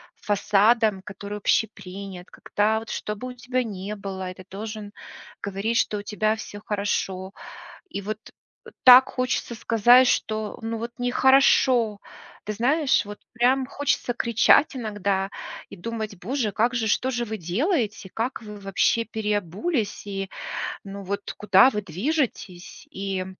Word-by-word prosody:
фасадом, 210 0 +2
который 205 +1 -7
общепринят, 195 -3 -2
когда 215 +2 0
вот 225 - -11
чтобы 210 +4 -4
у - - -7
тебя 250 0 -2
ни 205 -1 -5
было, 190 -2 -5
и - - -11
ты 185 - -13
должен 210 +1 -6 0.5
говорить, 200 +4 -1
что 210 - +1
у - - -8
тебя 215 +1 0
всё 205 -1 -8
хорошо. 195 -2 -2 0.6
И 200 - -4
вот, 215 +2 -4 0.5
э, - - -11
так 255 +1 +9
хочется 255 -2 -2
сказать, 240 +3 +5
что, 215 -2 -1
ну 225 0 -3
вот 235 +1 -5
нехорошо. 245 -3 +4 0.5
Ты 210 - -3
знаешь, 265 +4 +2
вот 205 0 -9
прям 255 +3 +3
хочется 280 -3 -1
кричать 235 +5 +4
иногда 200 -4 -1 0.4
и - - -9
думать: 220 +1 -5
"Боже, 230 0 -1
как 235 +5 +1
же? 225 -2 0
Что 260 +5 +1
же 240 -1 -1
вы 220 -1 -4
делаете? 210 - -1
Как 235 +2 -2
вы 210 -1 -9
вообще 200 +4 +1
переобулись? 210 - -2
И, 195 -1 -4 0.5
ну 200 0 -8
вот 200 +1 -4
куда 200 +4 +6
вы 210 - -2
движетесь?" 195 - -3
И 195 -1 -3
215 Hz, 145 wpm, -25 LUFS, 200-240 Hz, 0.6 s, так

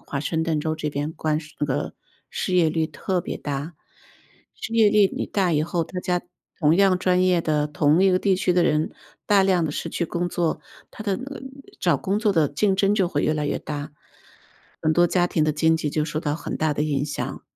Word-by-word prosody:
华 140 - -3
盛 160 +2 -1
顿 160 -2 0
州 155 +1 -1
这 150 -1 -3
边 145 +2 -3
关 155 -1 -1
税 150 -1 -14
这 145 - 0
个 135 - -2 0.4
失 185 - -2
业 170 -3 +4
率 160 0 0
特 180 +3 -2
别 175 - -5
大。 145 +3 -5 0.8
失 - - -7
业 220 -2 +6
率 210 0 +5
一 190 - -1
大 190 -4 0
以 150 -1 +2
后， 170 +1 -1
大 180 +3 -6
家 180 -1 -1 0.4
同 155 0 +4
样 195 -2 +4
专 185 0 +2
业 180 -2 +3
的， 150 -2 +1
同 150 +4 +2
一 195 - +5
个 185 - +3
地 195 0 +2
区 180 -1 +1
的 175 -1 +3
人， 155 -1 +1 0.4
大 200 -2 +5
量 185 -3 +2
地 - - -2
失 - - -4
去 170 - -1
工 175 +2 -2
作， 170 -2 -1 0.3
它 215 - -9
的 200 -3 +1
那 255 - -7
个 275 -2 -8 0.4
找 170 -6 +2
工 195 +7 -1
作 215 -2 +2
的 160 -5 +3
竞 190 +8 +1
争 195 +1 +3
就 195 -4 +2
会 145 -4 -1
越 155 - +1
来 150 -1 -1
越 - - -1
大， 145 0 -6 0.9
很 155 - +2
多 175 0 +5
家 175 0 +2
庭 160 -3 +1
的 155 - +1
经 160 +2 +3
济 155 -2 -2
就 150 +1 0
受 155 0 -3
到 150 -2 -1
很 160 - -5
大 155 -1 +1
的 150 - -1
影 145 -2 0
响。 150 0 -5
165 Hz, 255 characters per minute, -23 LUFS, 150-185 Hz, 0.9 s, 业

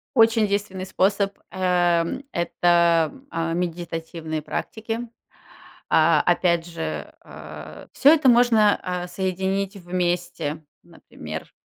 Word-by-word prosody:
Очень 225 -2 +4
действенный 200 -2 -2
способ- 200 +1 0
а, 175 -2 +2
м, 255 +11 -5
это, 170 -2 +2
м, 275 0 -17
а, 165 0 -2
медитативные 165 -2 -4
практики. 225 +8 -5 0.8
А, 160 +1 +4
опять 170 -1 +2
же, 80 - -5
а, 75 +1 -11
всё 285 +3 +6
это 300 -5 +4
можно, 235 -4 +4
а, 180 -1 -3
соединить 190 +2 -2
вместе. 175 -4 -2 0.2
Например, - - -10
180 Hz, 110 wpm, -23 LUFS, 165-200 Hz, 0.8 s, всё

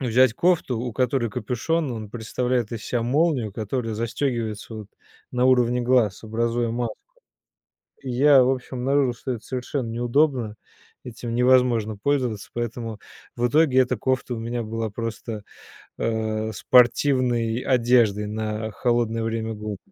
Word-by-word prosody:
взять 125 -1 +4
кофту, 165 -5 +1
у 125 +1 -3
которой 125 -1 +1
капюшон- 130 +7 -1
он 110 -3 -6
представляет 120 0 -2
из 115 -1 -5
себя 120 -2 -1
молнию, 130 -3 +1
которая 115 +2 -3
застегивается 115 -1 -3
вот 105 -2 -7 0.4
на 125 0 +1
уровне 125 -1 +3
глаз, 120 -5 +2
образуя 115 +1 -1
маску. 115 -2 -3 1.1
Я 135 +1 +5
в 125 - +2
общем 130 0 -4
обнаружил, 135 0 +2
что 130 +2 -5
это 115 - -5
совершенно 130 0 -3
неудобно, 120 -1 +1 0.5
этим 115 -1 -6
невозможно 120 -4 +3
пользоваться, 125 -4 -1
поэтому 115 -2 -4 0.4
в 120 +1 +1
итоге 145 -1 +4
эта 125 -2 +2
кофта 130 +1 -1
у - - -5
меня 120 +1 -3
была 115 0 -3
просто, 115 -1 -5 0.5
э, 110 -1 -1
спортивной 120 +1 +3
одеждой 115 -5 +3
на 110 0 -3
холодное 115 -1 0
время 115 0 -2
года. 105 -1 -5
120 Hz, 135 wpm, -24 LUFS, 110-125 Hz, 1.1 s, Я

